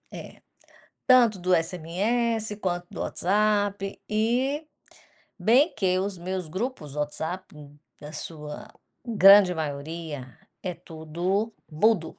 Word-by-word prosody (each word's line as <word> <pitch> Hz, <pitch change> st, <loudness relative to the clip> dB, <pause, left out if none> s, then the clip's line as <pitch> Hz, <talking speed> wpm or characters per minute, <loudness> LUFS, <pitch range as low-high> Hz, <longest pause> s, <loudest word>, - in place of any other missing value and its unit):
É, -, -, -10 dB, 0.7 s
tanto 240 Hz, -5 st, +5 dB
do 180 Hz, 0 st, +2 dB
SMS, 210 Hz, +7 st, 0 dB
quanto 175 Hz, -2 st, -2 dB
do -, -, -7 dB
WhatsApp 205 Hz, 0 st, 0 dB
e 250 Hz, +8 st, 0 dB, 0.7 s
bem 245 Hz, -, +4 dB
que 185 Hz, -2 st, +1 dB
os 195 Hz, -1 st, -2 dB
meus 180 Hz, -1 st, -4 dB
grupos, 185 Hz, -, -4 dB
o 150 Hz, -, -6 dB
WhatsApp, 160 Hz, +5 st, -4 dB, 0.5 s
da 150 Hz, +1 st, -9 dB
sua 155 Hz, +6 st, -6 dB, 0.4 s
grande 200 Hz, -4 st, +7 dB
maioria, 145 Hz, -3 st, -5 dB, 0.2 s
é 180 Hz, -2 st, -3 dB
tudo 175 Hz, +6 st, -3 dB, 0.2 s
mudo. 175 Hz, +2 st, +1 dB
185 Hz, 110 wpm, -26 LUFS, 165-215 Hz, 0.7 s, grande